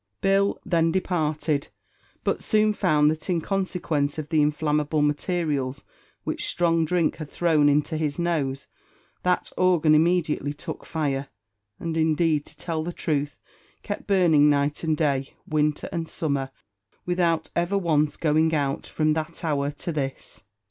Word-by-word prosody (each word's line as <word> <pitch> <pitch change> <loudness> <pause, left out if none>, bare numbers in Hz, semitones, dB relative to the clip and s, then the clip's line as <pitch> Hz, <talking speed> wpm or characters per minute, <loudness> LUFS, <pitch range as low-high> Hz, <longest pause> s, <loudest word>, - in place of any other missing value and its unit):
Bill 195 +1 +2
then 165 -3 +2
departed, 155 -5 -1 0.6
but - - 0
soon 215 -1 +3
found 155 -7 +3
that 155 +4 -6
in 175 -2 +2
consequence 170 -6 -1
of 155 -1 -5
the 160 -2 +3
inflammable 150 0 +1
materials 145 -3 -1 0.4
which - - -2
strong 165 -1 +2
drink 170 0 +1
had 155 -2 -7
thrown 155 -4 +3
into 150 +2 +1
his 150 -2 -2
nose, 145 -6 -1 0.6
that 180 0 0
organ 175 -4 +4
immediately 155 -3 +2
took 160 +2 -7
fire, 140 -4 -1 0.5
and, 165 -1 -3
indeed, 160 -1 +2
to 150 - -14
tell 160 0 -3
the 175 - -3
truth, 145 -4 -2 0.5
kept 205 - -5
burning 170 -7 +5
night 145 +1 +1
and 160 -2 +1
day, 140 -3 0
winter 150 -1 0
and 165 -3 -3
summer, 140 -4 -1 0.6
without 170 -2 0
ever 175 +4 +1
once 155 -5 +1
going 160 +1 +2
out, 140 -1 -1
from 155 -1 +1
that 160 +2 -4
hour 145 -3 0
to 150 +4 -5
this. 135 -4 -4
155 Hz, 145 wpm, -25 LUFS, 150-170 Hz, 0.6 s, burning